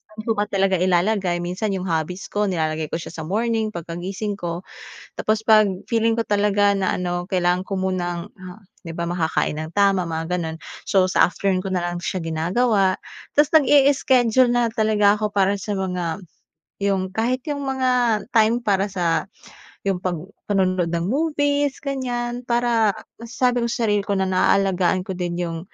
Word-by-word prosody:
ano 215 Hz, +1 st, -7 dB
ba 210 Hz, -1 st, 0 dB
talaga 195 Hz, -2 st, +1 dB
ilalagay 180 Hz, 0 st, +1 dB
minsan 195 Hz, +4 st, -2 dB
yung 185 Hz, -, -3 dB
hobbies 180 Hz, +1 st, -3 dB
ko 210 Hz, 0 st, 0 dB
nilalagay 160 Hz, -4 st, -1 dB
ko -, -, -4 dB
siya 165 Hz, -, -6 dB
sa 160 Hz, -1 st, -7 dB
morning 225 Hz, +3 st, 0 dB
pagkagising 190 Hz, +3 st, -5 dB
ko. 170 Hz, +1 st, -4 dB, 0.5 s
Tapos 215 Hz, 0 st, 0 dB
kapag 215 Hz, -3 st, +5 dB, 0.2 s
feeling 230 Hz, -1 st, +2 dB
ko 230 Hz, -, 0 dB
talaga 205 Hz, -1 st, +2 dB
na 190 Hz, -1 st, 0 dB
ano 175 Hz, -1 st, -2 dB
kailangan 180 Hz, -1 st, 0 dB
ko 190 Hz, -1 st, -3 dB
munang 175 Hz, -2 st, -2 dB, 0.6 s
di 165 Hz, -, -6 dB
ba 170 Hz, +1 st, -3 dB
makakain 160 Hz, -3 st, -1 dB
ng 155 Hz, +1 st, -6 dB
tama 195 Hz, -3 st, +3 dB
mga 165 Hz, +2 st, -2 dB
ganoon, 160 Hz, -1 st, -5 dB, 0.2 s
so 185 Hz, -1 st, +3 dB
sa -, -, +5 dB
afternoon 185 Hz, +2 st, -1 dB
ko 190 Hz, -, -2 dB
nalang 175 Hz, -1 st, -1 dB
siya 175 Hz, +1 st, -3 dB
ginagawa. 185 Hz, +5 st, +1 dB, 0.4 s
Tapos 295 Hz, 0 st, +4 dB
nag-i-iskedyul 260 Hz, -4 st, +4 dB
na 240 Hz, -1 st, +2 dB
talaga 215 Hz, -2 st, +3 dB
ako 210 Hz, -1 st, -2 dB
para 200 Hz, 0 st, +2 dB
sa 205 Hz, +2 st, -4 dB
mga 180 Hz, -2 st, -3 dB, 0.6 s
iyong 190 Hz, -2 st, 0 dB
kahit 245 Hz, +4 st, -1 dB
yung 285 Hz, -1 st, -3 dB
mga 250 Hz, -5 st, +1 dB
time 230 Hz, +1 st, +3 dB
para 200 Hz, -2 st, +1 dB
sa 170 Hz, -3 st, 0 dB, 0.6 s
iyong 190 Hz, -2 st, 0 dB
kapag 180 Hz, -2 st, -2 dB, 0.3 s
panonood 185 Hz, -3 st, +1 dB
ng 170 Hz, 0 st, -1 dB
movies 290 Hz, -, 0 dB
ganyan 245 Hz, -3 st, -3 dB
para 235 Hz, -3 st, +2 dB, 0.3 s
masasabi 245 Hz, +1 st, 0 dB
ko -, -, 0 dB
sa -, -, -2 dB
sarili 205 Hz, -2 st, +1 dB
ko 200 Hz, -1 st, -1 dB
na 190 Hz, -, +1 dB
naalagaan 185 Hz, -1 st, +2 dB
ko 190 Hz, -, -4 dB
din 175 Hz, -1 st, -3 dB
iyong 170 Hz, -2 st, -3 dB
195 Hz, 165 wpm, -22 LUFS, 175-225 Hz, 0.6 s, kapag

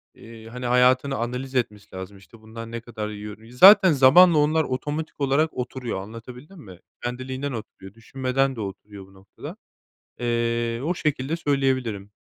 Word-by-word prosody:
eee, 115 Hz, -1 st, -13 dB
hani, 125 Hz, +2 st, -7 dB
hayatını 125 Hz, +2 st, +3 dB
analiz 125 Hz, +3 st, -4 dB
etmesi 105 Hz, -6 st, -3 dB
lazım, 95 Hz, +2 st, -8 dB
işte, 110 Hz, +3 st, -18 dB
bundan 115 Hz, +1 st, -10 dB
ne 115 Hz, 0 st, -5 dB
kadar 110 Hz, -2 st, -6 dB
yiyoru 105 Hz, 0 st, -9 dB
Zaten 190 Hz, +8 st, +8 dB
zamanla 155 Hz, +5 st, +6 dB
onlar 155 Hz, +2 st, +2 dB
otomatik 145 Hz, +4 st, -5 dB
olarak 140 Hz, +4 st, +1 dB
oturuyor. 125 Hz, -5 st, -5 dB
Anlatabildim 125 Hz, -, -11 dB
mi? 95 Hz, -, -13 dB, 0.2 s
Kendiliğinden 130 Hz, +3 st, -4 dB
oturuyor, 105 Hz, -4 st, -9 dB
düşünmeden 130 Hz, +3 st, -2 dB
de 115 Hz, -, -6 dB
oturuyor 100 Hz, 0 st, -8 dB
bu 95 Hz, -, -21 dB
noktada. 95 Hz, 0 st, -11 dB, 0.6 s
Eee, 115 Hz, 0 st, -1 dB
o 165 Hz, +5 st, 0 dB
şekilde 150 Hz, -2 st, -2 dB
söyleyebilirim. 130 Hz, -9 st, -1 dB
125 Hz, 145 wpm, -24 LUFS, 110-135 Hz, 0.6 s, Zaten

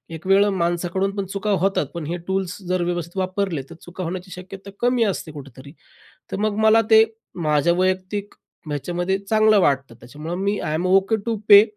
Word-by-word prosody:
एक 160 Hz, -, -11 dB
वेळं 200 Hz, +2 st, +5 dB
माणसाकडून 175 Hz, +2 st, 0 dB
पण 200 Hz, -1 st, -2 dB
चुका 200 Hz, +2 st, -4 dB
होतात. 195 Hz, -5 st, +1 dB
पण 170 Hz, -3 st, -5 dB
हे 170 Hz, +3 st, -3 dB
टूल्स 190 Hz, -1 st, -2 dB
जर 185 Hz, -1 st, +1 dB
व्यवस्थित 175 Hz, 0 st, -3 dB
वापरले 185 Hz, -4 st, -1 dB
तर 170 Hz, -, -10 dB
चुका 180 Hz, +1 st, -7 dB
होण्याची 180 Hz, +2 st, -5 dB
शक्यता 190 Hz, +2 st, -9 dB
कमी 245 Hz, -1 st, +2 dB
असते 190 Hz, -6 st, -2 dB
कुठेतरी. 140 Hz, -1 st, -11 dB, 0.6 s
तर -, -, -2 dB
मग 215 Hz, 0 st, 0 dB
मला 225 Hz, +1 st, +6 dB
ते 220 Hz, 0 st, +8 dB, 0.4 s
माझ्या 150 Hz, +3 st, +3 dB
वैयक्तिक 185 Hz, +3 st, -1 dB, 0.3 s
ह्याच्यामध्ये 175 Hz, +6 st, -2 dB
चांगलं 215 Hz, +1 st, +3 dB
वाटतं. 135 Hz, -5 st, +1 dB
त्याच्यामुळं 145 Hz, +8 st, -7 dB
मी, 200 Hz, +2 st, 0 dB
आयएम 155 Hz, +3 st, -2 dB
ओके 195 Hz, +3 st, +3 dB
टू 230 Hz, -1 st, 0 dB
पे. 205 Hz, 0 st, +10 dB
185 Hz, 175 wpm, -22 LUFS, 170-200 Hz, 0.6 s, पे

